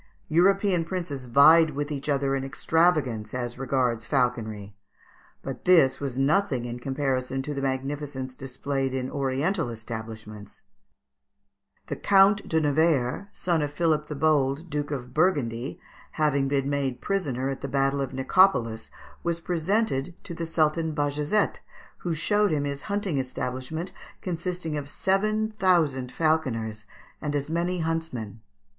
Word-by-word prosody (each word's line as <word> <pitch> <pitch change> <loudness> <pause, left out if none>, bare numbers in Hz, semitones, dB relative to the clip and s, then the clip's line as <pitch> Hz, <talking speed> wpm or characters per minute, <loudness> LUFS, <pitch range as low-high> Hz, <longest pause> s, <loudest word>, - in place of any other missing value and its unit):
European 185 +2 +3
princes 165 -7 -4
vied 155 +6 +7
with 145 +1 -3
each 145 0 -4
other 140 -1 +1
in 135 - -2
extravagance 135 -6 +1
as 120 0 -4
regards 125 -4 0
falconry; 110 -6 -1 0.7
but 135 -2 -6
this 160 -8 +5
was 135 -3 -4
nothing 135 -2 +2
in 120 0 -5
comparison 135 0 -1
to 150 - -4
the 140 - -3
magnificence 135 0 -3
displayed 135 0 -3
in 130 0 -3
oriental 140 +5 0
establishments. 110 -2 -8 1.2
The - - -4
Count 200 +1 +4
de 160 - +3
Nevers, 150 +1 +1
son 170 -5 0
of 145 -1 -2
Philip 150 -1 +1
the 150 - -5
Bold, 150 +1 +1
Duke 145 0 -2
of 125 -4 -5
Burgundy, 135 -7 0 0.3
having 145 -3 +1
been 135 -1 0
made 140 -3 -1
prisoner 135 -10 -1
at 135 - -4
the - - -3
battle 135 +1 +1
of 135 - -3
Nicopolis, 130 -6 +2 0.3
was 170 -1 -1
presented 175 -2 0
to 175 - -7
the 165 0 -4
Sultan 160 0 +1
Bajazet, 150 +7 0 0.4
who 170 -2 -2
showed 205 +6 +2
him 150 -3 0
his 140 -1 -3
hunting 200 -7 0
establishment 130 +6 -4 0.3
consisting 175 -3 -3
of 145 -1 -5
seven 215 +6 +1
thousand 165 -11 +2
falconers 115 -10 -1 0.3
and 145 -1 -2
as 145 +2 -2
many 175 +1 0
huntsmen. 145 -10 -3
145 Hz, 140 wpm, -26 LUFS, 130-165 Hz, 1.2 s, vied